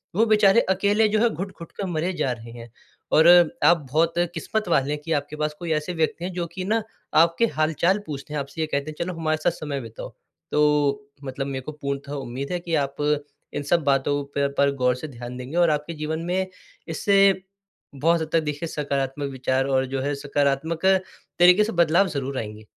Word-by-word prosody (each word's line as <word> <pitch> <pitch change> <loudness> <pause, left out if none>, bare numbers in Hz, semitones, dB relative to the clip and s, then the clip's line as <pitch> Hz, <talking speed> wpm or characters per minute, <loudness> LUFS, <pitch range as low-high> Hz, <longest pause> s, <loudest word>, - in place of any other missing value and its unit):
वो 220 +4 +4
बेचारे 215 0 +5
अकेले 205 +3 +3
जो 215 - +1
है, 235 +2 +4
घुट-घुट 180 -2 -7
कर 200 - -5
मरे 175 +2 -1
जा 135 - -1
रहे 115 -1 -7
हैं। 120 0 -10 0.4
और 160 +2 +6 0.4
आप 170 -5 +4
बहुत 165 +3 +2 0.2
किस्मत 215 +6 -2
वाले 140 -3 +2
हैं 150 - -4
कि 165 - -4
आपके 145 0 -2
पास 150 0 -1
कोई 170 -2 -4
ऐसे 155 +4 -2
व्यक्ति 165 +1 -1
हैं 185 - -3
जो 175 -1 -2
कि 185 - -3
ना 225 +3 +1 0.4
आपके 170 +7 +2
हाल-चाल 165 +5 +2
पूछते 150 0 -7
हैं - - 0
आपसे 140 +4 -6
ये 155 - 0
कहते 140 0 -2
हैं - - -12
चलो 185 - -4
हमारे 155 -1 0
साथ 175 - +3
समय 140 -3 -3
बिताओ। 115 -2 -8 0.4
तो 145 -2 +2 0.2
मतलब 135 +1 -4
मेरे 135 -1 -4
को 155 - -5
पूर्णतः 140 -1 -5
उम्मीद 135 +1 -5
है 180 - -1
कि 170 -1 -2
आप 135 - -11 0.6
इन 145 - -3
सब 165 +2 +1
बातों 140 0 +1
पे 140 0 +2
पर 140 0 +4
गौर 125 -2 +2
से 130 +5 -7
ध्यान 125 -2 -8
देंगी 125 +5 -7
और 175 -1 +4
आपके 150 +2 -1
जीवन 160 +1 -2
में 185 +2 0 0.4
इससे 195 +5 +2 0.8
बहुत 165 +4 +2
हद 160 - -2
तक 165 - +5
देखिए 150 +2 -3
सकारात्मक 140 -2 -2
विचार 130 0 0
और 130 -1 +2
जो 135 - 0
है 145 +2 -1
सकारात्मक 145 +4 -1 0.5
तरीक़े 180 +4 +7
से 225 - -2
बदलाव 170 +3 +4
ज़रूर 135 -2 -3
आएँगे। 105 -1 -7
150 Hz, 205 wpm, -24 LUFS, 140-170 Hz, 0.8 s, तरीक़े